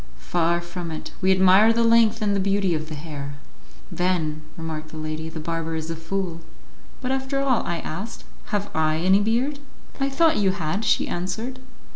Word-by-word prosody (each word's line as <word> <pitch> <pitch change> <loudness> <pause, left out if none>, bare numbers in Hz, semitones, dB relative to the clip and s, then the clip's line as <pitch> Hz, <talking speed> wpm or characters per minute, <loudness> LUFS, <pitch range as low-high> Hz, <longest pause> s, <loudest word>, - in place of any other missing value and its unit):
Far 165 - +1
from 175 0 -6
it; 160 -1 -6
we 190 0 +4
admire 190 +4 +6
the 230 +1 +2
length 230 -1 +4
and 205 -1 +2
the - - +1
beauty 195 -1 +2
of 155 0 -3
the 155 - -5
hair." 145 -2 -6 0.6
"Then," 165 -4 0 0.2
remarked 160 -1 -5
the 155 - -9
lady, 155 +1 -4
"the 160 - -7
barber 165 0 -3
is 160 +1 -3
a - - -3
fool." 170 +1 -3 0.6
"But 255 0 -1
after 265 +1 -1
all," 270 -4 +2
I 170 - -1
asked, 195 +9 -6 0.2
"have 205 -1 -2
I 155 0 +2
any 190 +4 +4
beard?" 240 +7 0 0.4
"I 275 0 +1
thought 320 +3 +3
you 195 -2 +3
had," 190 +4 -2
she - - +3
answered. 220 +9 -3
185 Hz, 185 wpm, -24 LUFS, 160-220 Hz, 0.6 s, admire